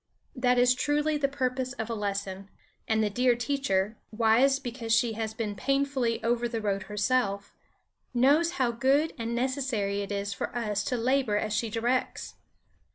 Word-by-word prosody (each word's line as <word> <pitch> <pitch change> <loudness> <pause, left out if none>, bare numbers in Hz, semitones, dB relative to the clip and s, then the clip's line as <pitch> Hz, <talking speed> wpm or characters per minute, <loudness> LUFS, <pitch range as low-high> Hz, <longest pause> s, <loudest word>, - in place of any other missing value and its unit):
That 250 -1 +2
is 245 0 +5
truly 295 +4 0
the 285 -1 +1
purpose 260 -2 -2
of 225 -5 -4
a 235 - -3
lesson. 200 -2 -4 0.4
And 220 0 +2
the 210 - +1
dear 245 +2 +3
teacher, 235 -5 -1
wise 230 +5 +4
because 245 -3 -6
she 225 0 +3
has 220 0 -4
been 220 -3 -3
painfully 275 -1 0
over 240 +1 +1
the 230 -1 -3
road 200 -2 -1
herself, 210 -2 0 0.6
knows 290 +8 +3
how 255 -8 +1
good 270 +7 +2
and 230 +1 -2
necessary 240 -6 -1
it 200 - -5
is 200 0 -2
for 200 - -5
us 210 -4 -1
to 250 - -1
labor 250 -2 +1
as 215 0 -2
she 225 +1 0
directs. 240 +4 -1
235 Hz, 165 wpm, -28 LUFS, 210-260 Hz, 0.6 s, is